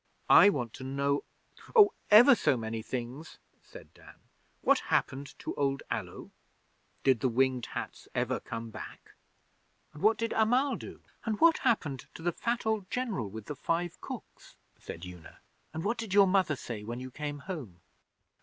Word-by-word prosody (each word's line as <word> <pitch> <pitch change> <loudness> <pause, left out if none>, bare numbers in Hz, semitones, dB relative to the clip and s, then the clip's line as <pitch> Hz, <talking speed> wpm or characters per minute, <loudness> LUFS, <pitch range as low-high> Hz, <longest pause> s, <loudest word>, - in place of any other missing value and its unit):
'I 205 - +9
want 125 - -2
to - - -9
know, 140 +2 0 0.5
oh, 415 -3 +8 0.2
ever 240 +7 +9
so 145 - +2
many 110 0 -4
things,' 125 +6 -6 0.2
said - - -14
Dan. - - -16 0.5
'What - - +4
happened 140 +1 -1
to - - -5
old 140 -1 -1
Allo? - - -5 0.7
Did 130 -4 +4
the 130 - +1
Winged 130 0 +1
Hats - - -7
ever - - 0
come 115 -1 -7
back? - - -10 0.8
And 150 - -11
what 220 +2 +4
did 230 -1 -2
Amal 250 +6 +2
do?' - - -10 0.2
'And 215 -2 -2
what 330 -1 +5
happened 150 - 0
to 160 - -9
the 175 - +1
fat 235 +5 -2
old 215 -4 -1
General 220 - -2
with 110 +1 -8
the 150 - -6
five 170 +5 -2
cooks?' - - -10 0.2
said 85 +2 -9
Una. 90 -2 -12 0.3
'And 160 +1 -5
what 225 +3 -1
did 215 -4 -3
your 200 -1 +8
Mother 185 -5 +2
say 115 -5 -7
when 120 +3 -5
you 130 0 -7
came 145 +1 -5
home? 140 - -7
145 Hz, 170 wpm, -30 LUFS, -, 0.8 s, I